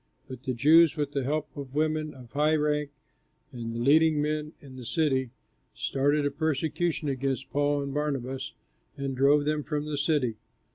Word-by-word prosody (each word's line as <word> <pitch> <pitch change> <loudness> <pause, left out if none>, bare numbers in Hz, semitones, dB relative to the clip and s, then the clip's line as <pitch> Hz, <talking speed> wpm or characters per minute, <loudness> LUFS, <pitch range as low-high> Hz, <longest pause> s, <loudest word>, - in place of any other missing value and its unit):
But 130 -2 -8
the 130 -2 -3
Jews, 160 +5 +6
with 145 -1 -1
the 140 -2 -1
help 150 +4 -2
of 140 -2 -8
women 155 -1 0
of 125 -3 -13
high 150 +2 +2
rank 150 -1 0 0.6
and 115 -3 -6
the - - -3
leading 155 +4 +4
men 150 +1 -1
in 135 -2 -13
the 130 - -8
city, 130 -1 0 0.5
started 145 +2 +1
a 145 - +1
persecution 155 +2 -1
against 135 0 -2
Paul 145 0 +1
and 140 -1 -5
Barnabas 135 -3 -3 0.4
and 135 -1 -3
drove 145 +3 +4
them 150 0 0
from 150 0 -3
the 150 -2 -3
city. 140 -7 +1
145 Hz, 175 wpm, -28 LUFS, 135-150 Hz, 0.6 s, Jews